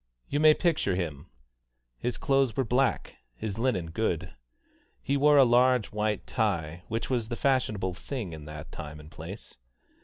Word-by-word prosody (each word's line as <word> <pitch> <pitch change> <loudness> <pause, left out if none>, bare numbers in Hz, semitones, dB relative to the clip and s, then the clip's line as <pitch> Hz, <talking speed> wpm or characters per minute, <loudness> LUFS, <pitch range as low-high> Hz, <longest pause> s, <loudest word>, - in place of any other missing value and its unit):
You 145 - 0
may 155 0 +7
picture 155 - +1
him. 80 -4 -4 0.7
His 125 - -2
clothes 135 -4 +1
were 135 - +3
black, 125 +2 0 0.2
his 105 - -4
linen 100 -10 0
good. 90 -5 -1 0.7
He 140 - -1
wore 145 +1 +5
a 135 - +8
large 125 -1 +4
white 105 -1 -1
tie, 90 -7 -1
which 115 +4 -3
was 120 -3 0
the 120 - -2
fashionable 110 -9 0
thing 95 - -5
in 75 -2 -9
that 75 -1 -8
time 75 0 -8
and 75 +1 -13
place. 85 - -9
110 Hz, 160 wpm, -28 LUFS, 85-130 Hz, 0.7 s, a